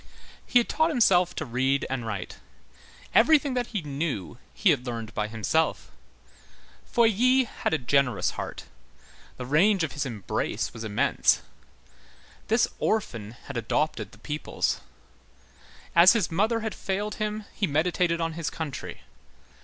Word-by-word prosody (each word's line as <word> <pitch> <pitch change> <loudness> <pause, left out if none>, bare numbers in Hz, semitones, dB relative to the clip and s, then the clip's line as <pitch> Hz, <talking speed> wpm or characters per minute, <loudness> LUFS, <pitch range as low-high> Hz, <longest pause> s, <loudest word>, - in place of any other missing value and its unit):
He - - +4
had 240 - +3
taught 315 +2 +2
himself 185 - +3
to - - -3
read 130 +3 0
and 130 -3 -3
write; 100 -5 -5 0.8
everything 285 +2 +5
that 245 -1 -1
he 205 -7 -4
knew, 140 - -4
he - - +3
had 125 - -1
learned 115 -2 -5
by 105 0 -1
himself. 115 +9 -1 1.0
Feuilly 240 +3 +4
had 240 - -3
a 160 - +2
generous 135 -1 +1
heart. - - -6 0.7
The 125 - -5
range 175 +8 +3
of 160 - -2
his 145 - -3
embrace 115 -7 -3
was 115 -1 -7
immense. 105 -2 +2 1.0
This 225 +2 +3
orphan 115 - -1
had 140 - -6
adopted 145 +7 -1
the - - -16
peoples. 150 0 -2 1.1
As 170 +4 +8
his 220 -8 0
mother 220 +7 +1
had 220 -1 -3
failed 205 +2 -3
him, 215 0 -2
he 200 - -1
meditated 170 +3 +1
on 165 -1 -1
his 165 -1 -3
country. 155 -5 -6
160 Hz, 140 wpm, -26 LUFS, 125-215 Hz, 1.1 s, As